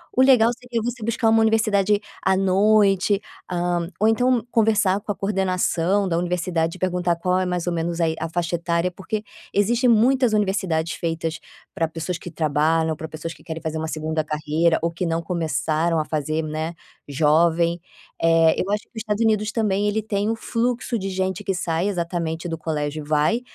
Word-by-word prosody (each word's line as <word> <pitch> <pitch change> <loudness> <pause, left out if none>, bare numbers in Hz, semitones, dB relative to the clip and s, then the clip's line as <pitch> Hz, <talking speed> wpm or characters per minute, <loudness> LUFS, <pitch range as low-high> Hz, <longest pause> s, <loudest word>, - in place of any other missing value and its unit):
O 260 - +4
legal 245 -4 +6
seria 245 -2 -4
você 240 0 -4
buscar 230 +1 +1
uma 225 0 +4
universidade 210 -2 +2 0.2
à 190 - +3
noite, 195 +1 +3 0.3
hã, 175 -1 -1
ou 215 - +5
então 245 +1 +2
conversar 210 -3 +3
com 205 - -4
a - - -3
coordenação 190 -1 0
da 165 - 0
universidade 175 -1 -1
e - - -12
perguntar 180 -1 0
qual 180 +2 0
é 185 - 0
mais 180 -1 -2
ou - - +1
menos 170 +1 -2
a 165 - +3
i 160 - -2
a - - -2
faixa 170 +1 -2
etária, 170 +1 0
porque, 210 +4 -4 0.3
existe 235 +5 +2
muitas 240 +1 +4
universidades 190 -6 0
feitas 165 -1 -3 0.4
pra 165 - 0
pessoas 165 +2 -4
que 175 - -9
trabalham, 160 +1 +1
pra 160 - -6
pessoas 160 +1 -6
que - - -19
querem 160 -1 -6
fazer 160 -1 -3
uma 160 0 -3
segunda 155 +1 -2
carreira 155 +2 +1
ou 170 - 0
que 170 +2 -3
não 165 0 -1
começaram 165 -1 0
a - - +1
fazer, 155 +1 -2
né, 155 +2 -3 0.3
jovem. 165 +4 +2 0.4
Eh, 165 -1 +4
eu 195 - -1
acho 210 +1 0
que - - -29
o - - -11
Estados 215 0 -1
Unidos 215 -1 +1
também 210 -2 +1
ele 215 +1 0
tem 205 0 -1
o 225 - 0
fluxo 235 +1 -1
de 195 +1 -3
gente 190 -1 -2
que 195 - -1
sai 175 +1 -1
exatamente 170 -3 -2
do 165 - -3
colégio 155 -1 -3
e - - -15
vai, 155 +10 +2
180 Hz, 195 wpm, -23 LUFS, 165-210 Hz, 0.4 s, legal